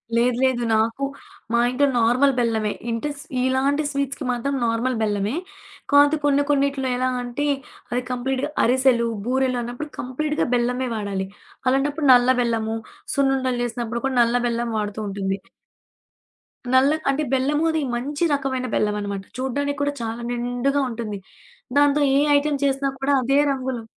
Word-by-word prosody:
లేదు, 240 +1 +3
లేదు. 255 -2 +2
నాకు 225 +5 0 0.5
మా 235 - +4
ఇంట్లో 280 +3 +2
నార్మల్ 255 +4 +4
బెల్లమే. 220 -3 +1 0.2
ఇంటే 230 +6 -2
స్ - - -9 0.2
ఇలాంటి 275 +3 +1
స్వీట్స్‌కి 280 0 -2
మాత్రం 245 +3 -2
నార్మల్ 230 +3 0
బెల్లమే. 210 +1 0 0.6
కాతే, 285 +2 +6
కొన్ని 285 0 +3
కొన్నిటిలో 275 -1 +1
ఎలా 255 +1 +1
అంటే 245 +4 -3 0.5
అది 245 +1 0
కంప్లీట్‌గా 260 +3 -1
అరిసెలు, 250 -1 +3 0.2
బూరెలన్నప్పుడు, 255 +2 -1
కంప్లీట్‌గా 300 +5 -1
బెల్లమే 250 +2 0
వాడాలి. 200 -3 -3 0.4
అలాంటప్పుడు 285 +3 +1
నల్ల 245 0 +5
బెల్లము, 225 -2 -1 0.4
సున్నుండలు 265 -3 +1
చేసినప్పుడు 235 0 -3
కూడా 265 -1 -1
నల్ల 235 +1 +2
బెల్లం 235 0 -1
వాడుతూ 210 0 -3
ఉంటుంది. 195 0 -2 1.4
నల్ల 260 +2 +5 0.2
అంటే, 275 +3 +1
బెల్లము 285 +4 +1
అది 320 -1 0
మంచి 285 +6 -3
రకమైన 260 -2 -1
బెల్లమనమాట. 205 -2 -1
చూడ్డానికి 285 +2 -2
కూడా 285 0 0
చాలా 230 +1 -4
నిండుగా 245 +4 0
ఉంటుంది. 220 -3 -5 0.6
దాంతో 290 0 +4 0.2
ఏ - - +5 0.2
ఐటెమ్ 285 -1 0
చేసినా 275 0 +1
కూడా 275 +1 +1
అదే 275 +3 +2
రంగులో 260 -3 -3
255 Hz, 140 wpm, -23 LUFS, 235-280 Hz, 1.4 s, కాతే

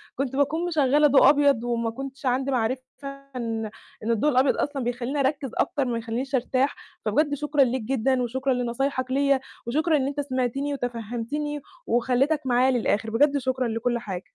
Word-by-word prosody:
كنت 270 0 -2
باكون 310 +5 +1
مِشغَّلة 295 -2 +4
ضوء 275 0 +6
أبيض 280 -5 +3
وما 235 -1 -1
كنتش 270 +3 -8
عندي 265 +2 +1
معرفة 255 +1 0 0.5
إن 225 -2 -2 0.4
إن 230 - 0
الضوء 230 +7 +2
الأبيض 260 +2 +3
أصلًا 280 -3 -2
بيخلّيني 245 +4 -2
أركِّز 275 -2 0
أكتر 280 -2 +1
ما 240 -2 -1
يخلّينيش 240 +4 -3
أرتاح. 260 +2 +1 0.3
فبجد 290 +7 +2
شكرًا 295 0 +2
ليك 255 0 -1
جدًا 260 +2 +1
وشكرًا 260 +2 0
لنصايحك 255 +2 -1
ليّا، 275 0 +3 0.3
وشكرًا 310 +5 +2
إن 270 -1 0
أنت 285 +1 -4
سمعتني 275 +1 -1
وتفهَّمتني 245 +4 -4 0.3
وخلّيتك 260 +6 +2
معايا 255 +1 +3
للآخِر، 225 -2 0
بجد 285 +5 +3
شكرًا 260 -1 -1
لكل 235 +1 -1
حاجة. 190 -5 -6
260 Hz, 165 wpm, -25 LUFS, 240-280 Hz, 0.5 s, ضوء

